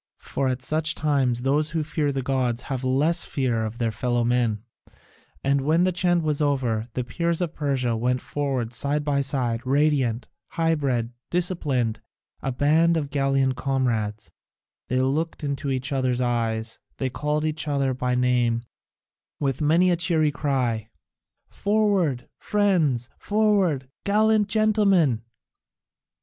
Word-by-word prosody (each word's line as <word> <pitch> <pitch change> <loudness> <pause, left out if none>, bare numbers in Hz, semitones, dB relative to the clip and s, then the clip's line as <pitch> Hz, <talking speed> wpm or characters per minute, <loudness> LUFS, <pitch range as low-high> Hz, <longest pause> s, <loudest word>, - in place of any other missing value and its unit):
For 135 - -2
at 130 -1 -2
such 155 +3 0
times 135 -5 +1
those 150 +3 +1
who 160 0 -1
fear 150 -1 -1
the 135 -1 -3
gods 125 -2 -1
have 130 -1 -3
less 145 +7 +2
fear 120 -5 -1
of 110 +1 -4
their 115 -2 0
fellow 120 +2 0
men. 120 -3 +1 0.8
And 140 0 +2
when 160 +5 +2
the 185 - +2
chant 175 -1 +1
was 150 -1 -1
over, 125 -6 0
the 125 - -1
Peers 170 +6 -1
of 175 -3 -2
Persia 130 -5 -1
went 125 +3 0
forward 135 -3 -3
side 145 +5 0
by 145 -1 +1
side, 125 -4 -1
radiant, 135 -4 +1 0.3
high 165 -1 +2
bred, 125 -6 -1 0.2
disciplined, 145 - 0 0.4
a 135 - -2
band 160 +6 +3
of 145 -3 -3
gallant 135 -2 +1
comrades; 115 -6 -1 0.6
they 130 - 0
looked 155 +5 -1
into 140 -1 -2
each 130 0 -2
other's 130 -2 0
eyes, 115 -2 -1 0.2
they 130 -2 -2
called 150 +4 -1
each 155 0 -1
other 140 -2 +1
by 125 0 -1
name, 125 -2 +1 0.8
with 135 -2 -1
many 170 +5 +4
a - - +3
cheery 160 -3 +1
cry, 125 -7 -1 0.6
"Forward, 200 - 0
friends, 170 - +1
forward, 200 -10 +1 0.2
gallant 215 0 +3
gentlemen!" 200 - +3
135 Hz, 140 wpm, -24 LUFS, 125-155 Hz, 0.8 s, many